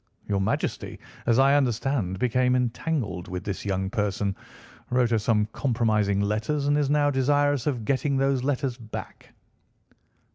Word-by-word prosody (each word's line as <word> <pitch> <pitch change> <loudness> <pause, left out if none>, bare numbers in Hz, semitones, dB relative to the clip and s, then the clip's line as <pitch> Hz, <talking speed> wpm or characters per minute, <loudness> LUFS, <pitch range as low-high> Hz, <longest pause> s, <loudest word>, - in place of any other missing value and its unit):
Your 100 -1 0
Majesty, 95 - -2 0.3
as 115 -1 +4
I 135 +1 +5
understand, 120 -7 0
became 125 +3 +2
entangled 120 - -2
with 90 +1 -5
this 100 -2 -4
young 95 -1 -1
person, 105 -3 -1 0.5
wrote 125 -1 +2
her 115 - +3
some 105 0 +2
compromising 110 -6 +1
letters, 110 +8 -1
and 145 0 +3
is 145 -2 +1
now 145 0 +3
desirous 145 0 +2
of 125 -7 -1
getting 140 +1 +1
those 135 -1 +1
letters 135 -2 -1
back." 110 -2 -9
125 Hz, 145 wpm, -26 LUFS, 105-140 Hz, 0.5 s, I